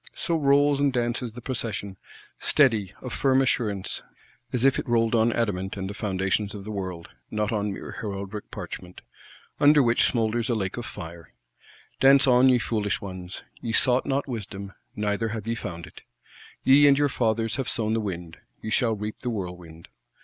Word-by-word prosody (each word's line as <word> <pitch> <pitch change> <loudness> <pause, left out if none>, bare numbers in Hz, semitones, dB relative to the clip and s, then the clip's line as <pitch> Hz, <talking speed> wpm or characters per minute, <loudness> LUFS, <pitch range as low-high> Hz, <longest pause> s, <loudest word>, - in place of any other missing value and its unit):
So 170 - -1
rolls 145 -1 +3
and 140 -1 +3
dances 120 -1 -1
the 125 - -9
Procession: 115 -6 -3 0.4
steady, 110 -10 +3
of 125 -3 -5
firm 130 +2 +3
assurance, 105 -7 0 0.5
as 125 0 +1
if 135 - +4
it - - -5
rolled 115 -1 +2
on 115 0 +3
adamant 100 -5 -2
and 95 -1 -3
the 100 - -5
foundations 100 0 -1
of 100 - -7
the 110 - -6
world; 95 -4 -5 0.2
not 105 +1 -1
on 105 -2 -1
mere - - -7
heraldic 100 0 -5
parchment,—under 145 +10 -1
which 115 -1 +3
smoulders 115 0 0
a 120 - +2
lake 95 -4 -2
of - - -5
fire. 85 0 -9 0.7
Dance 135 +1 +6
on, 130 0 +5
ye 125 - +5
foolish 105 -3 -1
ones; 95 -2 -8 0.2
ye 115 -1 -3
sought 125 +3 +4
not 140 +1 0
wisdom, 100 -5 -6 0.2
neither 105 +2 -1
have 110 -1 -5
ye 115 - -1
found 85 -7 -6
it. - - -14 0.6
Ye 145 +2 +7
and 140 -1 +6
your 145 0 +3
fathers 115 -3 0
have 135 -3 -2
sown 110 -1 0
the 115 - +1
wind, 85 -5 -5 0.2
ye 110 - -6
shall 115 0 +2
reap 105 +1 -5
the 125 - -3
whirlwind. 90 -6 -6
110 Hz, 180 wpm, -26 LUFS, 100-125 Hz, 0.7 s, Ye